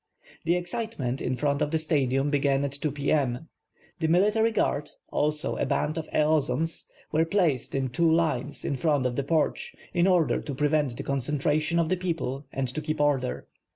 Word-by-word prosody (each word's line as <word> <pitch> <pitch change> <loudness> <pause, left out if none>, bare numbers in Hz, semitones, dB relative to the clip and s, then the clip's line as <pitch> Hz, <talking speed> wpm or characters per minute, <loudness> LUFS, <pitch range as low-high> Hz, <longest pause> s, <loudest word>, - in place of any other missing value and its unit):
The 170 - +3
excitement 175 - -3
in 125 - -1
front 140 +1 0
of - - +1
the 160 - +1
Stadium 140 -3 +1
began 140 -1 +2
at 140 - -2
2 145 +2 -3
p. 145 0 -2
m. 140 0 0 0.5
The 160 - +1
military 210 +7 +3
guard, 150 -9 0 0.2
also 150 0 0
a - - 0
band 150 +3 0
of 160 -2 -5
eozonos, 155 0 0 0.2
were 155 +1 +3
placed 165 - 0
in 135 -1 0
two 165 +6 +2
lines 150 -4 0
in 140 - -1
front 145 -2 +1
of 125 -1 0
the 140 - +1
porch, 155 +2 0 0.2
in 175 +1 +3
order 180 -4 +3
to 140 - -5
prevent 145 -3 +1
the 140 - -4
concentration 150 +4 0
of 165 -1 +2
the 185 - +1
people 155 -6 -3
and 135 -1 -2
to 140 +5 -4
keep 155 0 -3
order. 140 -4 +1
150 Hz, 190 wpm, -27 LUFS, 135-165 Hz, 0.5 s, The